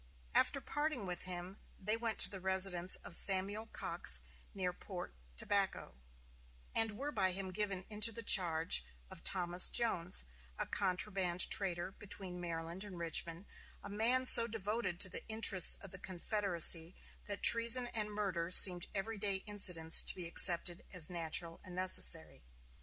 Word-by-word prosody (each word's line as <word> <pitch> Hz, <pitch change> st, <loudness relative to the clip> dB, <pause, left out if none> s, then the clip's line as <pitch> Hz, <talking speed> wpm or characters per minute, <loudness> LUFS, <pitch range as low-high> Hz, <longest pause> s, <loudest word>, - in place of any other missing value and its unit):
After -, -, -1 dB
parting 295 Hz, -7 st, -5 dB
with 180 Hz, -1 st, -6 dB
him 180 Hz, +2 st, -8 dB, 0.2 s
they 210 Hz, +3 st, -4 dB
went 230 Hz, -1 st, -6 dB
to -, -, +3 dB
the 195 Hz, -, -9 dB
residence 190 Hz, -1 st, 0 dB
of -, -, -7 dB
Samuel 200 Hz, +3 st, +2 dB
Cox -, -, -2 dB, 0.3 s
near 185 Hz, -3 st, -6 dB
Port 180 Hz, -1 st, -11 dB, 0.2 s
Tobacco, 200 Hz, -, -3 dB, 0.8 s
and 225 Hz, -2 st, -2 dB
were 285 Hz, +4 st, -7 dB
by 190 Hz, -7 st, -2 dB
him 190 Hz, 0 st, -6 dB
given 195 Hz, -2 st, -5 dB
into 215 Hz, +2 st, 0 dB
the 230 Hz, +1 st, -10 dB
charge 165 Hz, -, +3 dB, 0.3 s
of -, -, -14 dB
Thomas 175 Hz, -1 st, +3 dB
Jones, 185 Hz, -7 st, -2 dB, 0.3 s
a -, -, -5 dB
contraband 185 Hz, -2 st, -2 dB
trader 185 Hz, -2 st, -2 dB
between 190 Hz, -3 st, -11 dB
Maryland 170 Hz, +2 st, -8 dB
and 200 Hz, -4 st, -12 dB
Richmond, 170 Hz, +2 st, -1 dB, 0.4 s
a 200 Hz, -, -11 dB
man 235 Hz, +5 st, -1 dB
so 235 Hz, -2 st, +7 dB
devoted 210 Hz, -4 st, -6 dB
to 185 Hz, -, 0 dB
the -, -, -7 dB
interests 220 Hz, -4 st, +1 dB
of 195 Hz, -, -12 dB
the 195 Hz, -, -12 dB
Confederacy 180 Hz, -3 st, +1 dB, 0.3 s
that 205 Hz, -1 st, -7 dB
treason 235 Hz, +2 st, +7 dB
and 215 Hz, -3 st, -2 dB
murder 190 Hz, -5 st, -6 dB
seemed 180 Hz, -1 st, +6 dB
every 210 Hz, +2 st, -7 dB
day 195 Hz, -1 st, -5 dB
incidents 180 Hz, -6 st, +1 dB
to -, -, 0 dB
be 180 Hz, -, -7 dB
accepted 170 Hz, 0 st, +5 dB
as 180 Hz, -2 st, -1 dB
natural 165 Hz, 0 st, -3 dB
and 180 Hz, -1 st, -13 dB
necessary. 185 Hz, 0 st, +1 dB
190 Hz, 150 wpm, -33 LUFS, 175-210 Hz, 0.8 s, so